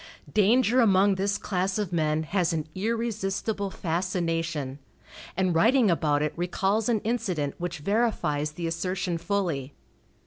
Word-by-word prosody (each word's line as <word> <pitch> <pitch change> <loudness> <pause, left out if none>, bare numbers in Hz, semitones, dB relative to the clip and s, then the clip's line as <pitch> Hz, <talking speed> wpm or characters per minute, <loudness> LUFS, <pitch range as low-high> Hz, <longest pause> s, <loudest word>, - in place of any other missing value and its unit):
Danger 230 +4 +4
among 200 -2 +4
this 200 +2 0
class 190 0 -1
of 205 -4 -2
men 155 -1 +1
has 175 +1 0
an 155 -2 -2
irresistible 210 -1 -2
fascination, 165 -5 -2 0.6
and 185 -2 +2
writing 225 +5 +4
about 150 -3 +1
it 150 - -1
recalls 195 +5 0
an 220 -3 +2
incident 195 - -1
which 175 0 -3
verifies 155 -6 0
the 170 +2 -5
assertion 175 +1 -2
fully. 165 -8 -2
185 Hz, 130 wpm, -27 LUFS, 165-205 Hz, 0.6 s, Danger